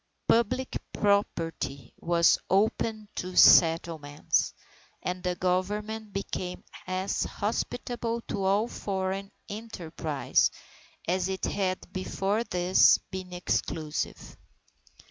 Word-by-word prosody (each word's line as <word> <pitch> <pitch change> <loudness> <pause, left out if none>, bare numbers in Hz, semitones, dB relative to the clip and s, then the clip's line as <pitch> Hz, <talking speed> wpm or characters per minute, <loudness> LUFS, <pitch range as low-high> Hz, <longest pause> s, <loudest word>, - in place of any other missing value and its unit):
Public 250 +3 +1
property 165 - -1
was 170 0 +4
opened 215 +1 +1
to 185 0 -4
settlement, 160 -3 +5 0.5
and 180 0 -3
the 180 -1 -1
Government 210 +4 -1
became 185 -2 -4 0.2
as 185 +1 -1
hospitable 235 +2 -2
to 200 - -4
all 200 +4 +2
foreign 195 -2 -3 0.2
enterprise 170 -9 -1 0.6
as 185 +2 +1
it 190 0 -2
had 185 -2 -2
before 195 +3 -1
this 180 -1 +5
been 185 -1 -6
exclusive. 160 -3 -3
190 Hz, 90 wpm, -28 LUFS, 175-210 Hz, 0.6 s, settlement